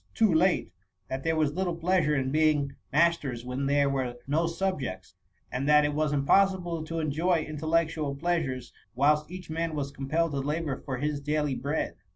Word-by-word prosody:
too 220 Hz, -5 st, +4 dB
late, 175 Hz, +3 st, +2 dB, 0.4 s
that 130 Hz, +1 st, -4 dB
there 160 Hz, 0 st, +1 dB
was 155 Hz, -2 st, +1 dB
little 180 Hz, 0 st, -1 dB
pleasure 170 Hz, -3 st, +2 dB
in 130 Hz, -1 st, 0 dB
being 150 Hz, -2 st, +2 dB, 0.2 s
mas 170 Hz, +3 st, +4 dB
ters 125 Hz, -4 st, -6 dB
when 130 Hz, +2 st, -2 dB
there 140 Hz, 0 st, +3 dB
were 130 Hz, -3 st, -2 dB
no 160 Hz, +4 st, +1 dB
subjects; 145 Hz, -, -3 dB, 0.4 s
and 130 Hz, +4 st, -1 dB
that 150 Hz, 0 st, +6 dB
it 145 Hz, -, 0 dB
was 155 Hz, 0 st, 0 dB
impossible 175 Hz, +3 st, +2 dB
to 165 Hz, +1 st, -5 dB
enjoy 160 Hz, +2 st, +1 dB
intellectual 155 Hz, -1 st, 0 dB
pleasures, 140 Hz, -6 st, -2 dB, 0.2 s
whUst 150 Hz, +3 st, +3 dB
each 180 Hz, -2 st, -8 dB
man 165 Hz, 0 st, -2 dB
was 140 Hz, -2 st, -3 dB
compelled 150 Hz, +4 st, -1 dB
to 140 Hz, -, -2 dB
labour 150 Hz, +1 st, -2 dB
for 130 Hz, -3 st, -5 dB
his 145 Hz, +2 st, -1 dB
daily 150 Hz, -1 st, 0 dB
bread. 140 Hz, +5 st, -2 dB
150 Hz, 180 wpm, -28 LUFS, 140-165 Hz, 0.4 s, that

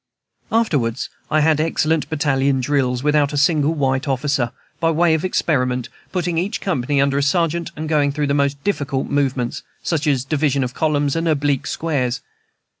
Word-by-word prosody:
Afterwards 140 Hz, -, 0 dB, 0.2 s
I 155 Hz, 0 st, +3 dB
had 155 Hz, 0 st, +3 dB
excellent 160 Hz, -1 st, 0 dB
battalion 140 Hz, -3 st, +1 dB
drills 130 Hz, -1 st, 0 dB
without 150 Hz, -1 st, +2 dB
a -, -, -1 dB
single 150 Hz, +1 st, +3 dB
white 135 Hz, -1 st, 0 dB
officer, 135 Hz, -2 st, 0 dB, 0.3 s
by 165 Hz, -, +2 dB
way 165 Hz, +1 st, +3 dB
of 160 Hz, -, 0 dB
experiment; 125 Hz, -9 st, 0 dB, 0.2 s
putting 175 Hz, -2 st, -1 dB
each 205 Hz, +6 st, -2 dB
company 145 Hz, -6 st, 0 dB
under 140 Hz, 0 st, +2 dB
a -, -, +1 dB
sergeant, 170 Hz, +3 st, +1 dB
and 155 Hz, +1 st, -5 dB
going 150 Hz, -2 st, +2 dB
through 150 Hz, +1 st, -1 dB
the 140 Hz, -, 0 dB
most 140 Hz, 0 st, 0 dB
difficult 140 Hz, -9 st, -1 dB
movements, 135 Hz, -4 st, 0 dB, 0.2 s
such 155 Hz, -2 st, -1 dB
as 135 Hz, -3 st, +1 dB
division 140 Hz, -2 st, +1 dB
columns 145 Hz, +1 st, 0 dB
and 165 Hz, 0 st, 0 dB
oblique 145 Hz, -1 st, +1 dB
squares. 130 Hz, -7 st, -1 dB
145 Hz, 165 wpm, -20 LUFS, 135-160 Hz, 0.3 s, I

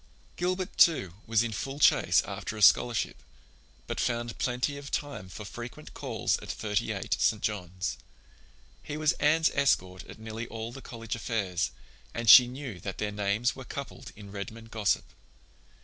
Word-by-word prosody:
Gilbert, 185 Hz, +1 st, -2 dB
too, 120 Hz, -, +5 dB
was 115 Hz, 0 st, +3 dB
in 120 Hz, -, -2 dB
full 135 Hz, +6 st, -4 dB
chase -, -, +5 dB
after 110 Hz, -, -5 dB
a -, -, -5 dB
scholarship, 120 Hz, +3 st, +4 dB, 0.6 s
but -, -, -4 dB
found 120 Hz, -1 st, -1 dB
plenty 125 Hz, +3 st, 0 dB
of 140 Hz, 0 st, -8 dB
time 145 Hz, -11 st, -4 dB
for 105 Hz, +3 st, -8 dB
frequent 120 Hz, +5 st, -9 dB
calls -, -, -1 dB
at -, -, -11 dB
Thirty 105 Hz, -1 st, -1 dB
eight, -, -, -1 dB
St. 110 Hz, -, +3 dB
John's. 95 Hz, -3 st, -3 dB, 0.8 s
He 150 Hz, -, -6 dB
was 155 Hz, -1 st, +3 dB
Anne's 160 Hz, +2 st, +4 dB
escort 95 Hz, -10 st, +1 dB
at -, -, -11 dB
nearly 110 Hz, +1 st, -6 dB
all 115 Hz, 0 st, -6 dB
the 135 Hz, -, -9 dB
college 115 Hz, -3 st, -6 dB
affairs, 100 Hz, -6 st, -1 dB, 0.5 s
and 115 Hz, 0 st, -3 dB
she 125 Hz, -2 st, +11 dB
knew 125 Hz, -6 st, -7 dB
that 95 Hz, +2 st, -6 dB
their 105 Hz, -1 st, -2 dB
names 105 Hz, +4 st, 0 dB
were 130 Hz, -, -8 dB
coupled 140 Hz, +2 st, -7 dB
in 100 Hz, -1 st, -11 dB
Redmond 110 Hz, +3 st, -7 dB
gossip. 105 Hz, -3 st, +1 dB
115 Hz, 165 wpm, -29 LUFS, 105-135 Hz, 0.8 s, she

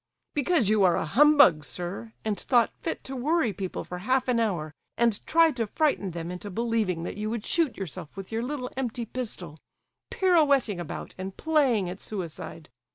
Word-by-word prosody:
"Because 290 Hz, -, +2 dB
you 210 Hz, -1 st, +4 dB
are 180 Hz, -2 st, +5 dB
a -, -, -1 dB
humbug, 280 Hz, -, +6 dB
sir; 180 Hz, +8 st, -5 dB
and 215 Hz, -1 st, 0 dB
thought 240 Hz, -3 st, +3 dB
fit 325 Hz, -, -4 dB
to 265 Hz, -, -6 dB
worry 265 Hz, -2 st, +1 dB
people 190 Hz, 0 st, -4 dB
for 180 Hz, -, -7 dB
half 255 Hz, +7 st, +1 dB
an 245 Hz, -2 st, +2 dB
hour, 170 Hz, -9 st, -1 dB, 0.2 s
and 235 Hz, -3 st, +2 dB
tried 325 Hz, -2 st, +4 dB
to 230 Hz, -2 st, 0 dB
frighten 285 Hz, -, +1 dB
them 170 Hz, 0 st, -5 dB
into 180 Hz, +3 st, -6 dB
believing 215 Hz, -5 st, -1 dB
that 175 Hz, -, -5 dB
you 210 Hz, +1 st, -2 dB
would 230 Hz, -1 st, -3 dB
shoot 325 Hz, -8 st, +1 dB
yourself 170 Hz, -3 st, -7 dB
with 195 Hz, +1 st, -7 dB
your 225 Hz, +1 st, -1 dB
little 250 Hz, 0 st, -4 dB
empty 245 Hz, -2 st, -3 dB
pistol, 195 Hz, -10 st, -6 dB, 0.5 s
pirouetting 285 Hz, -, +3 dB
about 175 Hz, -, -6 dB
and 190 Hz, +1 st, -6 dB
playing 275 Hz, -, +2 dB
at 180 Hz, +2 st, -6 dB
suicide! 170 Hz, -5 st, -6 dB
225 Hz, 180 wpm, -27 LUFS, 185-265 Hz, 0.5 s, humbug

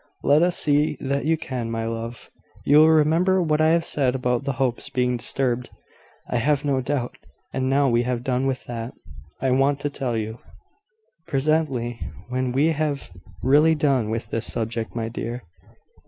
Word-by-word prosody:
"Let 145 Hz, +2 st, +4 dB
us 175 Hz, 0 st, +3 dB
see 150 Hz, 0 st, +2 dB
that 140 Hz, +1 st, -2 dB
you 160 Hz, +1 st, +2 dB
can, 125 Hz, -6 st, -4 dB
my 115 Hz, 0 st, -2 dB
love. 115 Hz, +1 st, -6 dB, 0.3 s
You 145 Hz, -, +5 dB
will 155 Hz, +1 st, +7 dB
remember 160 Hz, +5 st, +3 dB
what 155 Hz, -3 st, +1 dB
I 155 Hz, -, +4 dB
have 165 Hz, 0 st, +2 dB
said 130 Hz, -3 st, +1 dB
about 125 Hz, 0 st, -1 dB
the 140 Hz, -, -1 dB
Hopes 125 Hz, -1 st, -1 dB
being 125 Hz, -1 st, 0 dB
disturbed, 125 Hz, 0 st, 0 dB, 0.6 s
I -, -, -1 dB
have 145 Hz, +4 st, +1 dB
no 135 Hz, -2 st, +1 dB
doubt. 130 Hz, -2 st, -3 dB, 0.4 s
And 130 Hz, 0 st, -1 dB
now 140 Hz, +1 st, +3 dB
we 120 Hz, -2 st, +3 dB
have 120 Hz, -1 st, -2 dB
done 130 Hz, +1 st, 0 dB
with 135 Hz, -1 st, -3 dB
that, 115 Hz, 0 st, -6 dB, 0.5 s
I 130 Hz, -, +2 dB
want 135 Hz, +2 st, +2 dB
to 145 Hz, -, -2 dB
tell 130 Hz, -5 st, -2 dB
you 110 Hz, +1 st, -4 dB, 0.4 s
" 440 Hz, -, -46 dB
"Presently, 135 Hz, -5 st, 0 dB, 0.3 s
when 130 Hz, 0 st, -1 dB
we 140 Hz, +5 st, +2 dB
have 150 Hz, -, -2 dB, 0.3 s
really 150 Hz, +5 st, +5 dB
done 135 Hz, -7 st, +1 dB
with 115 Hz, +1 st, -4 dB
this 115 Hz, 0 st, -2 dB
subject, 115 Hz, 0 st, -3 dB
my 115 Hz, -1 st, -2 dB
dear. 120 Hz, +1 st, -5 dB
135 Hz, 180 wpm, -23 LUFS, 120-150 Hz, 0.6 s, will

